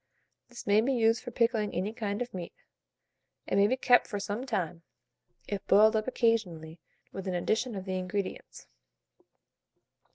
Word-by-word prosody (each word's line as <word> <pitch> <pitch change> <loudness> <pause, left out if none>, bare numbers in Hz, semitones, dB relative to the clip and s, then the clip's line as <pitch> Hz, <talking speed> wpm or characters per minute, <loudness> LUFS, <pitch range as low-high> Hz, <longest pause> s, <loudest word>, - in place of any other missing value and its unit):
This 245 - -10
may 205 +1 +4
be 265 +4 +1
used 225 -2 +2
for - - -7
pickling 230 -3 0
any 195 +5 -2
kind 210 0 -2
of 245 - -13
meat, 175 -2 -7 0.9
and - - +1
may 200 - +5
be 255 +4 0
kept 245 -1 +4
for 205 -3 -4
some 205 +6 -4
time, 175 -7 -2 0.7
if 200 -2 -4
boiled 215 +2 +6
up 215 +1 0
occasionally 180 -10 0 0.3
with 195 0 -7
an 185 - -1
addition 220 +6 -1
of 190 -1 -6
the 185 -1 -2
ingredients. 185 +2 -5
210 Hz, 160 wpm, -29 LUFS, 190-230 Hz, 0.9 s, boiled